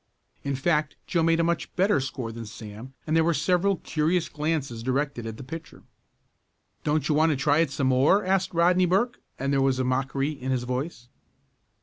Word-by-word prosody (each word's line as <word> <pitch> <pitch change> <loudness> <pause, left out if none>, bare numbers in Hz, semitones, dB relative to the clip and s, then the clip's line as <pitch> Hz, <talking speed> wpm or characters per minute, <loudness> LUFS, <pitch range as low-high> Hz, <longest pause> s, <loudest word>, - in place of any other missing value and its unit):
In 140 -1 -1
fact 150 +1 0
Joe 170 - 0
made 165 0 +3
a - - +3
much 170 0 -1
better 195 -1 +3
score 130 -3 -4
than 115 -1 -7
Sam, 110 +4 -10
and 155 - 0
there 165 - +5
were 170 0 +2
several 180 +6 +2
curious 165 +2 0
glances 150 -6 -2
directed 130 -1 -1
at 110 -1 -6
the - - -8
pitcher. 160 +5 -9 1.0
"Don't 150 0 +1
you 155 - +2
want 155 +2 +4
to 155 - +2
try 145 +3 +2
it 165 -3 +3
some 140 0 -2
more?" 135 +11 +4
asked 190 0 +1
Rodney 180 +2 +3
Burke, 205 +7 +1 0.2
and 140 +1 -1
there 135 - +3
was 135 -1 +2
mockery 135 +3 0
in 130 -3 -6
his 130 -2 0
voice. 125 0 -4
150 Hz, 195 wpm, -26 LUFS, 130-165 Hz, 1.0 s, there